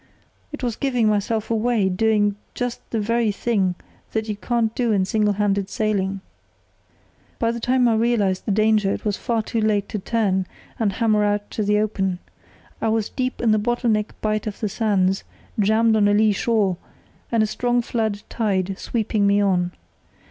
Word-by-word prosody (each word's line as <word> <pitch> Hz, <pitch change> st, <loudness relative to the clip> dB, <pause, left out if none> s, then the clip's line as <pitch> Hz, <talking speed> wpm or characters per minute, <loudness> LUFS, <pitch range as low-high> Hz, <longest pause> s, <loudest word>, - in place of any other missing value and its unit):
It 295 Hz, -3 st, -7 dB
was 240 Hz, -3 st, -1 dB
giving 250 Hz, -5 st, +1 dB
myself 215 Hz, +2 st, -1 dB
away, 225 Hz, -2 st, +2 dB
doing 205 Hz, +1 st, +2 dB, 0.2 s
just 245 Hz, -1 st, -3 dB
the 225 Hz, -, -1 dB
very 230 Hz, +1 st, +1 dB
thing 195 Hz, -4 st, 0 dB, 0.4 s
that 220 Hz, 0 st, -1 dB
you 210 Hz, -, -2 dB
can't 225 Hz, +2 st, -1 dB
do 240 Hz, -2 st, 0 dB
in 195 Hz, -3 st, +2 dB
single 210 Hz, +1 st, +1 dB
handed 200 Hz, -1 st, 0 dB
sailing. 195 Hz, -2 st, -1 dB, 1.2 s
"By 230 Hz, -1 st, +1 dB
the 235 Hz, -, -4 dB
time 250 Hz, +1 st, +2 dB
I 230 Hz, -, +3 dB
realised 220 Hz, -5 st, +1 dB
the -, -, +1 dB
danger 215 Hz, -1 st, +3 dB
it -, -, -4 dB
was 205 Hz, -2 st, +1 dB
far 230 Hz, -1 st, -1 dB
too 225 Hz, +1 st, -2 dB
late 210 Hz, -2 st, +1 dB
to 210 Hz, -, -3 dB
turn 190 Hz, -3 st, 0 dB, 0.3 s
and 210 Hz, -4 st, +1 dB
hammer 215 Hz, 0 st, +2 dB
out 205 Hz, 0 st, -1 dB
to -, -, -3 dB
the 210 Hz, 0 st, +2 dB
open. 195 Hz, -3 st, 0 dB, 0.6 s
I -, -, +1 dB
was 220 Hz, -1 st, 0 dB
deep 255 Hz, -1 st, -3 dB
in 230 Hz, -2 st, +3 dB
the 215 Hz, -, +3 dB
bottle 240 Hz, +2 st, 0 dB
neck 210 Hz, 0 st, -2 dB
bight 215 Hz, 0 st, -1 dB
of 210 Hz, -, -5 dB
the 215 Hz, -, -1 dB
sands, 195 Hz, -3 st, +1 dB, 0.4 s
jammed 220 Hz, +2 st, +3 dB
on 210 Hz, -1 st, +4 dB
a 205 Hz, -, +3 dB
lee 215 Hz, 0 st, +4 dB
shore, 205 Hz, -4 st, +1 dB, 0.5 s
and 230 Hz, -2 st, +3 dB
a -, -, +3 dB
strong 240 Hz, +2 st, 0 dB
flood 220 Hz, -3 st, -2 dB
tide 195 Hz, -4 st, -1 dB
sweeping 215 Hz, -3 st, 0 dB
me 200 Hz, 0 st, +4 dB
on. 180 Hz, -3 st, +1 dB
215 Hz, 185 wpm, -22 LUFS, 200-230 Hz, 1.2 s, on